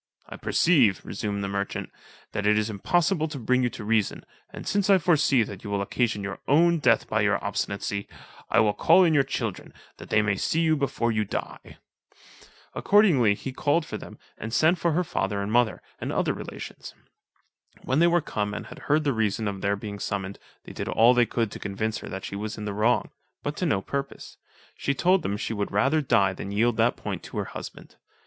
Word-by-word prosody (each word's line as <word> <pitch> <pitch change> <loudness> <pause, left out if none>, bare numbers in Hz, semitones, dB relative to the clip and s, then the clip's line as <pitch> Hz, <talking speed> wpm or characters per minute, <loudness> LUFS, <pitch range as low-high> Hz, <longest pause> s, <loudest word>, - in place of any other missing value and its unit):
"I - - -8
perceive," 130 - +3
resumed 100 -1 -3
the - - -2
merchant, 100 0 -3 0.4
"that 100 - -2
it 105 0 +4
is 105 +1 0
impossible 160 - +1
to 155 -2 -7
bring 125 +1 +1
you 125 - +1
to 115 - -8
reason, 110 -1 0 0.2
and - - -9
since 205 -1 +1
I 195 - +7
foresee 150 -8 +3
that 100 -3 -8
you 105 - -6
will 100 -1 -1
occasion 110 -1 -1
your 100 0 -5
own 170 +4 +4
death 115 -6 +3
by 110 - 0
your 105 0 +2
obstinacy, 100 0 -3 0.4
I 115 - +4
will 105 -1 +2
call 175 - +5
in 165 -3 +3
your 145 - +5
children, 115 -7 -4 0.3
that - - -11
they 105 - +3
may 100 -2 0
see 165 - 0
you 160 -1 +3
before 135 -5 -1
you 110 -1 +1
die." 100 - -6 1.0
Accordingly 155 - +4
he 130 +5 -7
called 150 +4 +1
for - - -6
them, - - -11 0.2
and 110 - -5
sent 160 +8 +3
for 170 -2 +1
her 180 +3 +1
father 100 - -2
and 100 +1 -3
mother, 120 -2 +2 0.2
and - - -4
other - - 0
relations. - - -8 0.9
When 130 +3 +1
they 170 - +5
were 175 0 +3
come 105 -6 -3
and - - -6
had - - -11
heard 155 +2 +3
the 140 -2 +1
reason 110 -1 0
of 100 -1 -4
their 100 0 +1
being 100 0 -7
summoned, 100 0 -4 0.2
they - - -10
did - - -5
all 120 +2 +5
they 120 -1 +3
could 115 -3 -1
to - - -8
convince 105 +2 -3
her - - -9
that 95 0 -6
she - - -6
was 105 +2 -5
in 105 - -5
the 105 - -3
wrong, 110 +4 +1 0.3
but 145 +1 -3
to 180 - 0
no 95 -10 0
purpose: 140 0 -5 0.4
she 140 - -1
told 180 +5 +3
them 100 -9 -2
she 115 - -3
would 100 -2 -3
rather 135 +10 +2
die 100 -8 +2
than 95 - -7
yield 115 +3 +1
that - - +2
point - - -5
to - - -9
her - - -1
husband. - - -10
115 Hz, 215 wpm, -26 LUFS, 100-150 Hz, 1.0 s, I